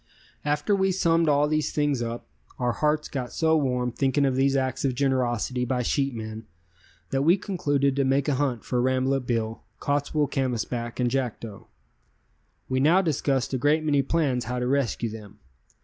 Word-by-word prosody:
_] - - -38 0.4
After 150 +7 +1
we 190 0 +2
summed 165 -3 +2
all 145 0 +3
these 155 0 0
things 145 -4 0
up, 115 -4 -4 0.3
our 125 -1 0
hearts 150 +4 0
got 125 -3 -4
so 160 -1 +2
warm 125 -4 0
thinking 135 +3 +1
of 135 -2 +1
these 135 +1 +2
acts 130 -1 -1
of 130 -3 0
generosity 125 -2 0
by 125 0 -1
sheepmen 115 -5 -2 0.6
that 135 - +1
we 170 +7 +4
concluded 145 -8 0
to 140 - +3
make 135 +2 +1
a 145 - +2
hunt 130 -4 -1
for 125 -1 0
Rambolet 130 0 0
Bill, 115 -2 -2 0.2
Cottswool 145 +1 0
Canvasback 120 -2 -2
and 120 -1 +1
Jackdo. 120 -5 -4 1.0
We 130 0 0
now 165 +8 +4
discussed 140 -5 0
a 130 - 0
great 150 +4 +2
many 145 -2 +2
plans 135 -4 0
how 125 +2 -3
to 125 - -1
rescue 130 -3 0
them. 105 -2 -10
135 Hz, 175 wpm, -26 LUFS, 125-145 Hz, 1.0 s, we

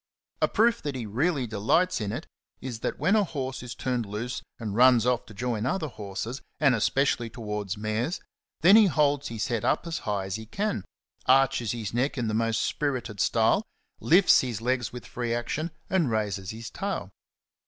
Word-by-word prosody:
A - - +5
proof 230 +1 +2
that 145 -2 -3
he 120 -3 -4
really 135 - 0
delights 120 - +1
in 105 -1 -2
it - - -5 0.3
is 125 -4 -6
that - - -3
when 200 - +2
a 215 - +4
horse 135 -6 -4
is 125 0 -7
turned 125 -4 -2
loose 110 +5 -4 0.2
and 105 -4 -4
runs 125 -1 +6
off 125 -1 +1
to 110 - -11
join 120 0 -1
other 155 +3 -1
horses, 110 +3 -5 0.2
and 140 -4 +5
especially 135 -3 +1
towards 105 -3 -4
mares, 110 - -2 0.4
then 185 +5 +8
he 220 -2 +8
holds 145 -4 +2
his 115 0 -3
head 115 -3 -1
up - - +1
as 165 -1 -3
high 100 -2 -2
as 95 +2 -3
he 110 0 -9
can, 195 - -2 0.4
arches 130 -3 +4
his 110 -4 -5
neck 130 +4 0
in 120 -3 -1
the 110 - -1
most 115 0 +1
spirited 125 -8 -2
style, 115 - +3 0.4
lifts 180 +4 +6
his 120 -5 -3
legs 125 0 -1
with 125 -1 -8
free 120 -1 -2
action, 145 +7 -2 0.2
and 180 -8 +2
raises 105 -4 -2
his 115 +1 -7
tail. - - -4
120 Hz, 190 wpm, -27 LUFS, 110-140 Hz, 0.4 s, then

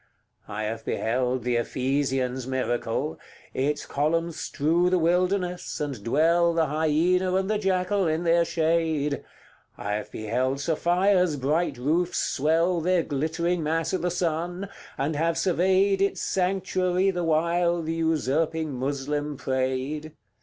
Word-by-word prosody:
I 110 +2 -4
have 110 +1 -4
beheld 125 +1 -1
the 120 0 +1
Ephesian's 130 0 -1
miracle 120 -9 -2 0.3
Its 145 +3 -1
columns 165 +3 -1
strew 170 +5 +1
the 185 - +3
wilderness, 180 +2 0
and 140 -8 -4
dwell 165 +7 +3
The 165 -1 +3
hyaena 160 +5 +1
and 190 0 +1
the 210 0 0
jackal 190 -1 +1
in 160 +2 0
their 170 0 +4
shade; 160 -3 0 0.5
I 100 - -3
have 105 0 -4
beheld 125 +5 -1
Sophia's 175 +2 +2
bright 145 +2 0
roofs 165 +8 0
swell 165 +4 +1
Their 180 0 +2
glittering 160 +5 -1
mass 160 +3 -1
i' - - +2
the 180 0 -1
sun, 175 +2 -2 0.3
and 145 +3 -1
have 165 +2 0
surveyed 190 +2 +2
Its 200 - +1
sanctuary 185 0 +1
the 175 -2 -2
while 170 +1 +1
the 160 +1 -2
usurping 160 -1 0
Moslem 145 +2 -2
prayed; 130 +3 -2
CLIV. 155 - -10
160 Hz, 135 wpm, -26 LUFS, 135-175 Hz, 0.5 s, their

